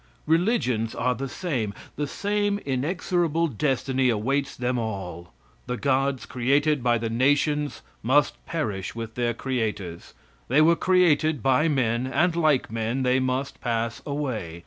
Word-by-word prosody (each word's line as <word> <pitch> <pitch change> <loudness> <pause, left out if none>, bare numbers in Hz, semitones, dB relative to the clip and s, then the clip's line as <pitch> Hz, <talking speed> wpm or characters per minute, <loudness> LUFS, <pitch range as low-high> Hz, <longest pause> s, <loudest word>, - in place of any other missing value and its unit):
Religions 160 - +1
are 125 +2 +1
the 135 +2 -5
same. 125 - -3 0.2
The 145 0 -2
same 205 +4 0
inexorable 165 +4 0
destiny 130 -1 0
awaits 135 +5 0
them 125 0 -1
all. 95 -6 -5 0.4
The 125 0 -2
gods 135 0 0
created 140 +4 +1
by 120 -1 +3
the 115 0 -2
nations 145 +5 +1 0.2
must 140 +6 +2
perish 105 - -3
with 115 -1 -6
their 120 -1 -1
creators. 110 -10 -3 0.3
They 135 +5 +3
were 165 +2 +6
created 160 - +3
by 135 +4 +3
men, 125 -4 +1
and 165 +6 +1
like 155 -8 +2
men, 115 +4 -1
they 125 +1 +3
must 130 +2 -2
pass 115 -1 -2
away. 125 - -4
130 Hz, 140 wpm, -25 LUFS, 115-150 Hz, 0.4 s, were